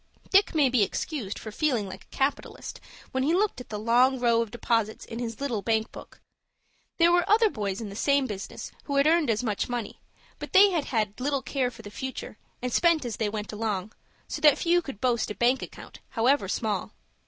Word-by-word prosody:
Dick 390 Hz, -2 st, +4 dB
may 295 Hz, -3 st, +5 dB
be 250 Hz, -3 st, +2 dB
excused 210 Hz, +1 st, -2 dB
for 220 Hz, -, -7 dB
feeling 240 Hz, -4 st, 0 dB
like 190 Hz, 0 st, -9 dB
a -, -, -15 dB
capitalist 275 Hz, +2 st, -2 dB, 0.3 s
when 260 Hz, -, -1 dB
he 310 Hz, +6 st, +2 dB
looked 405 Hz, -7 st, 0 dB
at -, -, -12 dB
the 210 Hz, -, -4 dB
long 245 Hz, +4 st, +3 dB
row 235 Hz, -1 st, +3 dB
of 230 Hz, -, -3 dB
deposits 225 Hz, -1 st, -1 dB
in 230 Hz, -, -7 dB
his 230 Hz, -2 st, -4 dB
little 250 Hz, -7 st, -2 dB
bank 220 Hz, +2 st, 0 dB
book. -, -, -12 dB, 0.8 s
There 340 Hz, 0 st, +5 dB
were 350 Hz, 0 st, +4 dB
other 440 Hz, 0 st, +5 dB
boys 205 Hz, -6 st, -3 dB
in 220 Hz, -3 st, -5 dB
the 200 Hz, -, -9 dB
same 280 Hz, +4 st, +2 dB
business 205 Hz, -5 st, -6 dB
who 285 Hz, -, -2 dB
had 280 Hz, 0 st, +4 dB
earned 320 Hz, -3 st, +3 dB
as 225 Hz, +2 st, +1 dB
much 215 Hz, -1 st, -1 dB
money, 240 Hz, -4 st, -4 dB, 0.4 s
but -, -, -8 dB
they 395 Hz, +1 st, +8 dB
had 330 Hz, -5 st, 0 dB
had 215 Hz, -3 st, -1 dB
little 275 Hz, +1 st, -1 dB
care 260 Hz, -3 st, 0 dB
for 230 Hz, -2 st, -13 dB
the 205 Hz, -, -9 dB
future, 260 Hz, -2 st, -6 dB, 0.2 s
and 250 Hz, -1 st, -2 dB
spent 335 Hz, -5 st, +3 dB
as 235 Hz, -3 st, -4 dB
they 220 Hz, -2 st, 0 dB
went 210 Hz, 0 st, -5 dB
along, 210 Hz, -2 st, -3 dB, 0.3 s
so 300 Hz, -, -5 dB
that 300 Hz, -2 st, +6 dB
few 350 Hz, +1 st, +2 dB
could 275 Hz, -, -9 dB
boast 240 Hz, -3 st, +1 dB
a 210 Hz, -, -4 dB
bank 250 Hz, +2 st, +2 dB
account, -, -, -10 dB
however 245 Hz, -1 st, +2 dB
small. 210 Hz, 0 st, -2 dB
245 Hz, 215 wpm, -27 LUFS, 215-285 Hz, 0.8 s, they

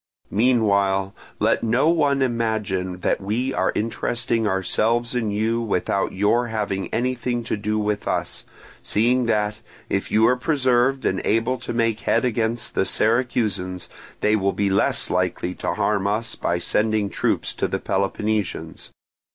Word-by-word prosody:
Meanwhile, 100 Hz, -4 st, +2 dB, 0.2 s
let -, -, +2 dB
no 120 Hz, +7 st, +2 dB
one 145 Hz, -5 st, +2 dB
imagine 105 Hz, -7 st, -1 dB
that -, -, 0 dB
we 120 Hz, +7 st, -1 dB
are 95 Hz, -, +1 dB
interesting 115 Hz, +1 st, -1 dB
ourselves 115 Hz, +5 st, +1 dB
in 120 Hz, -3 st, -1 dB
you 110 Hz, +3 st, 0 dB
without 100 Hz, -2 st, 0 dB
your 105 Hz, +5 st, +1 dB
having 105 Hz, -4 st, -2 dB
anything 120 Hz, 0 st, -1 dB
to 115 Hz, -, -2 dB
do 105 Hz, +1 st, -2 dB
with 105 Hz, -1 st, -1 dB
us, -, -, -2 dB, 0.4 s
seeing 120 Hz, +3 st, +2 dB
that, 105 Hz, -1 st, 0 dB, 0.3 s
if 95 Hz, -, -1 dB
you 110 Hz, +1 st, +4 dB
are 125 Hz, -, +4 dB
preserved 130 Hz, -1 st, +1 dB
and 95 Hz, -, 0 dB
able 115 Hz, +4 st, +1 dB
to 125 Hz, -, -6 dB
make 115 Hz, -2 st, 0 dB
head 120 Hz, -, +1 dB
against 115 Hz, -1 st, -1 dB
the -, -, +2 dB
Syracusans, 105 Hz, -5 st, 0 dB, 0.3 s
they 105 Hz, +1 st, +3 dB
will 100 Hz, -2 st, +1 dB
be 100 Hz, -1 st, 0 dB
less 95 Hz, -, +2 dB
likely 90 Hz, 0 st, -1 dB
to -, -, -3 dB
harm 100 Hz, -2 st, +1 dB
us 110 Hz, +3 st, -1 dB
by 85 Hz, -, -1 dB
sending 105 Hz, +3 st, 0 dB
troops -, -, -1 dB
to -, -, -1 dB
the -, -, -2 dB
Peloponnesians. 105 Hz, +1 st, -2 dB
110 Hz, 150 wpm, -23 LUFS, 100-120 Hz, 0.4 s, you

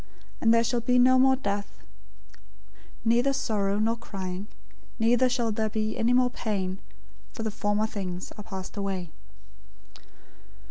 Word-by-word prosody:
And 225 Hz, -, +4 dB
there 230 Hz, 0 st, +5 dB
shall 235 Hz, +1 st, 0 dB
be 250 Hz, +2 st, +2 dB
no 255 Hz, +1 st, +6 dB
more 265 Hz, 0 st, +5 dB
death; 205 Hz, -5 st, -3 dB, 1.3 s
neither 240 Hz, +4 st, +3 dB
sorrow, 205 Hz, -7 st, 0 dB
nor 225 Hz, +2 st, +1 dB
crying, 190 Hz, -3 st, -6 dB, 0.5 s
neither 245 Hz, +2 st, +3 dB
shall 240 Hz, -3 st, 0 dB
there 220 Hz, +1 st, -1 dB
be 215 Hz, 0 st, -2 dB
any 230 Hz, +2 st, +1 dB
more 250 Hz, 0 st, +4 dB
pain: 195 Hz, -5 st, -3 dB, 0.5 s
for 225 Hz, -, -5 dB
the 220 Hz, -, -2 dB
former 205 Hz, +1 st, 0 dB
things 185 Hz, -4 st, -5 dB
are 210 Hz, -, -9 dB
passed 190 Hz, -2 st, -7 dB
away." 190 Hz, -4 st, -3 dB
220 Hz, 140 wpm, -27 LUFS, 200-240 Hz, 1.3 s, no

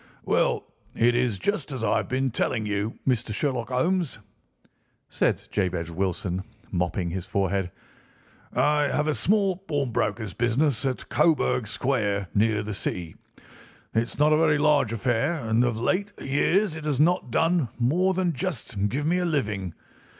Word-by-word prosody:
"Well, -, -, +2 dB, 0.3 s
it 120 Hz, +1 st, +4 dB
is 120 Hz, -4 st, +1 dB
just 185 Hz, -, -2 dB
as 130 Hz, -4 st, -4 dB
I -, -, +2 dB
have -, -, -2 dB
been 130 Hz, 0 st, 0 dB
telling 110 Hz, 0 st, -1 dB
you, 105 Hz, +2 st, -2 dB
Mr. 120 Hz, -3 st, +1 dB
Sherlock 130 Hz, -5 st, -1 dB
Holmes," 165 Hz, +4 st, 0 dB, 0.9 s
said -, -, 0 dB
Jabez 90 Hz, -4 st, -1 dB
Wilson, 95 Hz, +1 st, -2 dB, 0.3 s
mopping 90 Hz, 0 st, -1 dB
his 90 Hz, 0 st, -4 dB
forehead; 95 Hz, -1 st, 0 dB, 0.8 s
"I 150 Hz, 0 st, +2 dB
have 150 Hz, +2 st, 0 dB
a 155 Hz, -, +2 dB
small 195 Hz, +1 st, +2 dB
pawnbroker's 120 Hz, -, -2 dB
business 120 Hz, +2 st, +1 dB
at 130 Hz, -, -3 dB
Coburg 150 Hz, -8 st, +2 dB
Square, 105 Hz, -6 st, -1 dB
near 105 Hz, 0 st, +2 dB
the 105 Hz, 0 st, -4 dB
City. 85 Hz, -4 st, -4 dB, 0.8 s
It's 115 Hz, +1 st, -1 dB
not 150 Hz, +2 st, +4 dB
a -, -, +4 dB
very 155 Hz, -2 st, +3 dB
large 145 Hz, -5 st, +3 dB
affair, 120 Hz, +6 st, +1 dB
and 115 Hz, -5 st, +1 dB
of 120 Hz, -2 st, 0 dB
late 200 Hz, -, 0 dB
years 165 Hz, +7 st, +1 dB
it 160 Hz, -1 st, -7 dB
has 145 Hz, -3 st, 0 dB
not 165 Hz, -3 st, +3 dB
done 165 Hz, +1 st, +2 dB
more 175 Hz, +10 st, +2 dB
than 180 Hz, -2 st, +1 dB
just 120 Hz, -, -2 dB
give 145 Hz, +7 st, -2 dB
me 175 Hz, +3 st, +2 dB
a -, -, 0 dB
living. 105 Hz, -, -1 dB
125 Hz, 155 wpm, -26 LUFS, 105-155 Hz, 0.9 s, it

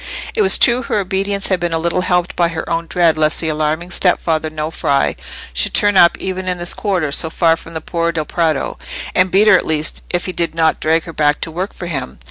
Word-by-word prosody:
It 445 Hz, -, 0 dB
was 390 Hz, -, +5 dB
true 240 Hz, 0 st, +4 dB
her 230 Hz, -, -2 dB
obedience 195 Hz, 0 st, -1 dB
had 185 Hz, -2 st, +1 dB
been 175 Hz, -1 st, -2 dB
a -, -, +1 dB
little 170 Hz, +2 st, 0 dB
helped 180 Hz, -1 st, 0 dB
by 170 Hz, -, +2 dB
her 165 Hz, -1 st, -5 dB
own 165 Hz, 0 st, -2 dB
dread 170 Hz, -3 st, +2 dB
lest 155 Hz, +1 st, +2 dB
the 160 Hz, -, -2 dB
alarming 155 Hz, +3 st, -2 dB
stepfather 165 Hz, -3 st, 0 dB
Nofri 155 Hz, -2 st, -1 dB, 0.4 s
should -, -, +2 dB
turn 205 Hz, -1 st, +5 dB
up 170 Hz, -2 st, +5 dB
even 185 Hz, 0 st, -5 dB
in 180 Hz, -1 st, -1 dB
this 175 Hz, 0 st, -2 dB
quarter, 180 Hz, -8 st, -1 dB
so 160 Hz, -, 0 dB
far 165 Hz, 0 st, +2 dB
from 165 Hz, 0 st, -13 dB
the 160 Hz, -, -3 dB
Por' 170 Hz, +1 st, -1 dB
del 160 Hz, -2 st, -3 dB
Prato, 160 Hz, -3 st, -1 dB, 0.3 s
and 185 Hz, 0 st, +3 dB
beat 200 Hz, +4 st, +3 dB
her 210 Hz, -, +7 dB
at -, -, +2 dB
least, 155 Hz, -1 st, 0 dB
if 175 Hz, 0 st, -2 dB
he 185 Hz, -, -3 dB
did 170 Hz, -2 st, -3 dB
not 160 Hz, -1 st, +1 dB
drag 160 Hz, +1 st, +1 dB
her 165 Hz, -, -9 dB
back 150 Hz, -1 st, +1 dB
to 165 Hz, -, -3 dB
work 180 Hz, +5 st, -4 dB
for 175 Hz, -, -8 dB
him. 135 Hz, -, -5 dB
170 Hz, 240 wpm, -17 LUFS, 160-185 Hz, 0.4 s, her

